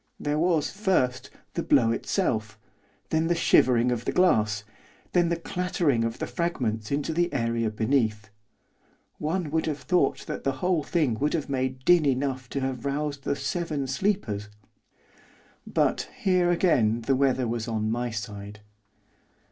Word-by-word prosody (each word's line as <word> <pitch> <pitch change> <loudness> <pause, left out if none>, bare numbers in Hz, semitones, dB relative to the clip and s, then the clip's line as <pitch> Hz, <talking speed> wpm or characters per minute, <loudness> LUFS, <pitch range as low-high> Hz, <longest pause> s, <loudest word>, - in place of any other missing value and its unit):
There 150 +1 -1
was, 165 -2 +1
first, 185 -11 0 0.2
the - - -1
blow 115 -3 +3
itself, 110 - -1 0.5
then 160 +1 +2
the 175 - +2
shivering 125 -7 +4
of 120 -1 -2
the - - 0
glass, 110 - +2 0.5
then 175 -2 +3
the 170 - +1
clattering 170 -7 0
of 115 0 -1
fragments 115 -13 -2
into 145 +3 -1
the 175 +2 +1
area 115 -2 0
beneath. 110 -1 0 0.9
One 160 0 -2
would 160 0 0
have 150 -2 -1
thought 180 -1 +1
that 155 - -5
the 135 - +1
whole 170 +5 0
thing 145 -7 0
would 145 +2 +1
have 155 -4 -3
made 130 -1 -2
din 175 -4 +5
enough 130 -1 -1
to 140 - -3
have 130 -2 -3
roused 140 0 -3
the - - 0
Seven 155 -4 -2
Sleepers. 135 - -1 1.2
But, - - 0
here, 180 -2 +2
again 125 - +2
the 135 +4 +1
weather 130 -2 +2
was 115 0 -3
on 110 -1 -1
my 120 +1 -1
side. 105 -1 -7
135 Hz, 150 wpm, -26 LUFS, 115-165 Hz, 1.2 s, din